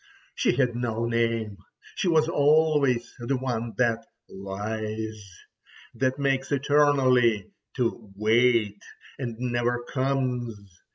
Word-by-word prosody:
She - - +1
had 125 -4 +1
no 115 -1 -2
name, 115 -3 -1 0.3
she - - -2
was 160 -2 +3
always 150 -5 +2
the 125 +3 -1
one 120 -3 -3
that 120 -2 +1 0.3
lies, 110 +2 -5 0.7
that 130 +2 0
makes 135 -1 0
eternally 130 -6 +3 0.2
to 115 -4 -2
wait, 110 -1 +2 0.4
and 120 -4 -4
never 120 0 -1
comes. 130 -4 -1
120 Hz, 105 wpm, -26 LUFS, 110-135 Hz, 0.7 s, was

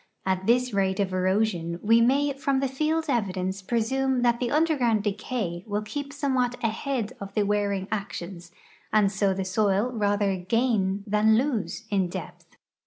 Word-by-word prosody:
At 190 0 -1
this 250 0 +3
rate 190 0 +1
of 190 -2 0
erosion, 185 -2 0
we 230 +2 +5
may 280 +4 +3
from 275 -1 0
the 270 - +1
field 310 +4 0
evidence 195 -6 -1
presume 250 +4 0
that 235 -1 +3
the 245 - -1
underground 275 -9 +2
decay 205 -4 -3
will 210 0 -2
keep 280 +6 -5
somewhat 260 -4 0
ahead 230 +1 -2
of 200 0 -8
the 210 - +3
wearing 200 -1 0
actions, 180 -4 -5 0.4
and 210 -2 +3
so 195 0 +1
the 190 0 -2
soil 200 +4 +1
rather 205 -3 +1
gain 200 0 0
than 215 +1 +3
lose 235 -4 -1
in 195 -3 +2
depth. - - -9
215 Hz, 160 wpm, -26 LUFS, 195-250 Hz, 0.4 s, we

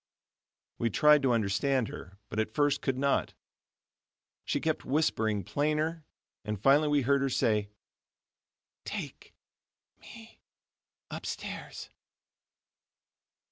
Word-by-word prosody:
We 115 - +1
tried 150 +6 +5
to 135 -2 +2
understand 115 +3 +1
her, 95 +2 -10
but 110 - -3
at 110 0 -2
first 145 -1 +2
could 135 -2 -1
not. 140 +1 0 1.1
She - - 0
kept 160 -1 -1
whispering 110 -8 0
plainer, 155 - -1 0.4
and 105 -1 -4
finally 140 +7 +4
we 145 -2 +2
heard 140 +2 +2
her 135 - +1
say: 110 -5 +1 1.1
"Take - - -7 0.7
me 225 -1 -14 0.7
upstairs. - - -6
135 Hz, 100 wpm, -30 LUFS, 110-150 Hz, 1.1 s, tried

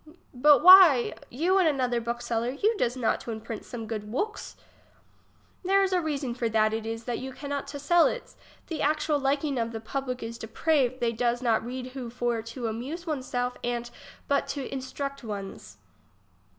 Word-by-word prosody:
But 290 +4 +5
wliy, 360 -9 +8
you 350 +9 +2
and 365 - +4
another 250 -5 +1
book 235 +1 -4
seller, 235 0 -1
you 405 - +1
does 250 - -1
not 240 -3 0
to 235 - -6
imprint 220 0 -6
some 230 -2 -7
good 215 -1 -5
wooks? 420 - -3 1.1
There 390 +2 +3
is 380 -1 0
a 360 - +2
reason 285 -6 -2
for 235 -1 -2
that, 215 0 +2
it 225 0 -3
is 225 +1 -4
that 240 0 -3
you 265 +1 -6
cannot 285 +1 -5
to 285 - -6
sell 330 +4 +4
its. - - -5 0.3
The 320 -3 -5
actual 300 0 +1
liking 275 0 0
of 230 0 -2
the 225 - -4
public 255 +2 -4
is 230 +1 -6
depraved 260 +2 0
they 235 -1 +2
does 240 +2 -1
not 225 -3 +2
read 250 +1 -6
who 255 -3 -6
for 240 -1 -1
to 230 +2 -7
amuse 265 +11 -5
one's 290 -6 -3
self 245 0 -2
ant 240 0 -3 0.4
but 280 0 +1
to 275 -2 -5
instruct 275 +1 -5
one's. 200 -3 -7
255 Hz, 190 wpm, -27 LUFS, 235-290 Hz, 1.1 s, wliy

